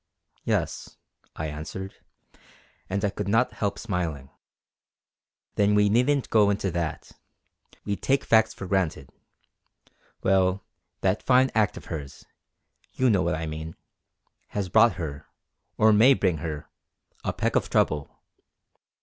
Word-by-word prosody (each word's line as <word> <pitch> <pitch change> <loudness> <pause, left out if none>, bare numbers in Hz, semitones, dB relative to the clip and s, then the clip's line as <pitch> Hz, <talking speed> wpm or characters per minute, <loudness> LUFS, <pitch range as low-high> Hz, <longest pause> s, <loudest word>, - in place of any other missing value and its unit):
"Yes," - - -2 0.4
I 80 - -4
answered, 80 +6 -6 1.0
and 100 +2 -1
I 100 - 0
could 105 0 -5
not 115 +5 +2
help 100 -2 -2
smiling. 80 -8 -4 1.3
"Then 105 0 +3
we 105 0 +4
needn't 125 +5 +2
go 105 -2 +5
into 100 -2 -1
that. 85 -2 -4 0.7
We 100 - -1
take 135 +1 +1
facts 110 -1 +4
for 100 - -8
granted. 95 -3 -1 1.1
Well, 95 0 +2 0.4
that 95 +2 +1
fine 130 0 +4
act 110 -2 +1
of - - -10
hers 75 -5 -7 0.7
you 130 -2 +2
know 100 -3 +3
what - - 0
I 80 +1 -4
mean 80 +1 -6 0.7
has 100 -3 -3
brought 110 +2 +5
her, 80 -6 -6 0.5
or 110 0 +5
may 120 +6 +6
bring 90 -8 +1
her, 75 -1 -5 0.6
a - - -1
peck - - -2
of - - +1
trouble. 75 -2 +1
95 Hz, 130 wpm, -26 LUFS, 80-110 Hz, 1.3 s, may